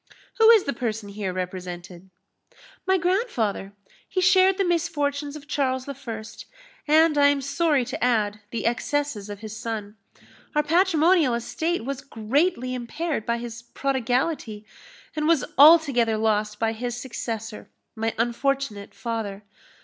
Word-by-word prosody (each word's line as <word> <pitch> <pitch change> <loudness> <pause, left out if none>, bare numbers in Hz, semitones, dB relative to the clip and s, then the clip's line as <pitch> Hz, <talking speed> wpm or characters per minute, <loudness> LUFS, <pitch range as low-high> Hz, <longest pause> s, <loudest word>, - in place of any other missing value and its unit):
Who 450 0 +7
is 450 -4 +7
the 280 - -2
person 225 -3 -4
here 200 -2 -4
represented?" 180 0 -6 0.8
"My 380 0 +4
grandfather. 350 - -1 0.4
He 370 - -1
shared 370 +1 +5
the 395 - +2
misfortunes 295 -4 -1
of 290 -2 -10
Charles 260 -3 -1
I., 280 - -5 0.9
and, 310 0 +4
I 285 - +6
am 285 0 +2
sorry 280 -1 +1
to - - -4
add, 215 -4 +1
the 230 -1 -4
excesses 240 -2 -1
of 205 0 -7
his 215 -1 -7
son. 220 -3 -5 0.6
Our 300 - +3
patrimonial 330 -3 +3
estate 315 +5 -2
was 275 0 -4
greatly 255 +3 0
impaired 255 +2 -3
by 235 0 +1
his 235 -1 -7
prodigality, 250 -3 -2 0.5
and 305 0 0
was 320 -6 +3
altogether 275 -7 +6
lost 215 -1 0
by 225 +1 0
his 240 +1 -4
successor, 225 -3 -6 0.3
my 225 0 -2
unfortunate 240 -2 -1
father. 220 -4 -4
250 Hz, 135 wpm, -24 LUFS, 220-300 Hz, 0.9 s, Who